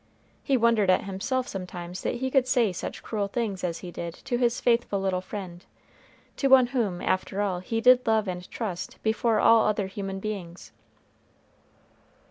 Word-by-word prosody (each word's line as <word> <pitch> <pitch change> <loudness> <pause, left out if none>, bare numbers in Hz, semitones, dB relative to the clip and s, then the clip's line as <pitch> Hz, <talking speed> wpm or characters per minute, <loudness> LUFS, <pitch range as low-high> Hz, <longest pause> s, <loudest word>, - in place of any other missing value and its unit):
He 275 -2 +1
wondered 230 -4 +3
at 185 - +4
himself 230 +7 -2
sometimes 180 -1 -6
that - - -2
he 260 +2 -2
could 265 -2 +3
say 240 -6 +2
such - - -6
cruel 205 -3 -2
things 205 -3 -3
as 170 -2 -1
he 175 - -7
did 170 0 -6
to 245 -3 0
his 240 -1 +1
faithful 235 -4 +1
little 190 -1 -1
friend 185 -2 -8 0.7
to 275 - +1
one 265 -2 +7
whom, 205 -9 -1
after 185 +1 -1
all, 195 -3 0
he 225 +5 -3
did 250 0 +5
love 220 -2 +2
and 180 -1 -5
trust 195 -7 -5
before 220 0 +1
all 230 -1 +6
other 210 -1 0
human 195 0 -5
beings. 190 -4 -6
205 Hz, 170 wpm, -26 LUFS, 185-235 Hz, 0.7 s, one